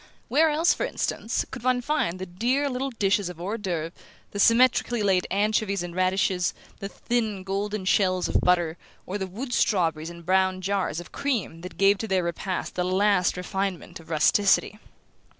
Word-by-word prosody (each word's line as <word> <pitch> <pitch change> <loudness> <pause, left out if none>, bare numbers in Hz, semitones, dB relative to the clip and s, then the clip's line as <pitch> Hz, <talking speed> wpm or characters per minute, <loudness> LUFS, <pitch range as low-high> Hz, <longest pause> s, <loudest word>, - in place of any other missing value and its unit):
Where 310 +6 +4
else, 315 +3 +3
for - - -3
instance, 230 - -2
could - - -7
one 255 0 +2
find 245 - -1
the 185 - -5
dear 250 +10 0
little 260 +2 -2
dishes 200 -5 0
of 175 -2 -10
hors 200 +6 -3
d'oeuvre, 170 -5 -3 0.4
the 200 - -5
symmetrically 240 0 +4
laid 190 -3 +2
anchovies 200 -1 0
and 175 -1 -7
radishes, 185 -1 +1 0.2
the 195 - -5
thin 220 -4 -2
golden 200 +1 -3
shells 185 -2 +2
of - - +1
butter, 175 -2 +2 0.3
or 200 +3 -4
the 190 - -3
wood 245 +7 -6
strawberries 165 -8 +1
and 170 -1 -11
brown 185 +1 +2
jars 190 -4 -1
of 175 - -10
cream 235 -12 -2
that 180 +1 -9
gave 195 0 +4
to 220 - -3
their 190 -3 +1
repast 170 +2 -3
the 180 - -1
last 185 0 +2
refinement 185 -2 -4
of 165 - -16
rusticity? 200 +6 +3
195 Hz, 175 wpm, -25 LUFS, 180-220 Hz, 0.4 s, Where